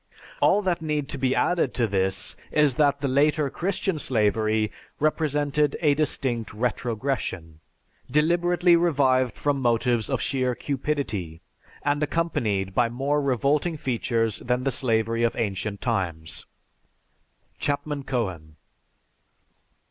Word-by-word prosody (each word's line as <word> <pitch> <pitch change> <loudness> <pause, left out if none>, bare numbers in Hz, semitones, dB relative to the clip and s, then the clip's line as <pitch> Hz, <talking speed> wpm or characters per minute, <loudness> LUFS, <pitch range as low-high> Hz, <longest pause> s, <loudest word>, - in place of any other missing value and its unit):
"All 205 - +4
that 175 -3 0
need 150 -3 -2
be 130 0 +1
added 170 -7 +1
to 120 - +2
this 95 -2 -1 0.2
is 150 -3 +4
that 140 +1 +2
the 140 - 0
later 145 +1 +2
Christian 185 -2 -1
slavery 110 -3 +1 0.3
represented 150 -1 +1
a 150 -3 +4
distinct 130 -6 -1
retrogression, 115 - -2 0.5
deliberately 175 +4 +3
revived 135 -7 +2
from 145 -2 0
motives 120 -1 +1
of - - 0
sheer 130 -2 0
cupidity, 120 - -3 0.4
and 145 +1 +1
accompanied 115 - -1
by 120 +2 +2
more 140 +5 0
revolting 140 +5 +1
features 115 -6 -1
than 125 +1 -1
the 135 - +1
slavery 115 -2 0
of 115 -1 +1
ancient 100 -2 -3
times." 85 -9 -2 1.1
(_Chapman 145 0 -2
Cohen. 95 - -3
130 Hz, 115 wpm, -25 LUFS, 110-150 Hz, 1.1 s, All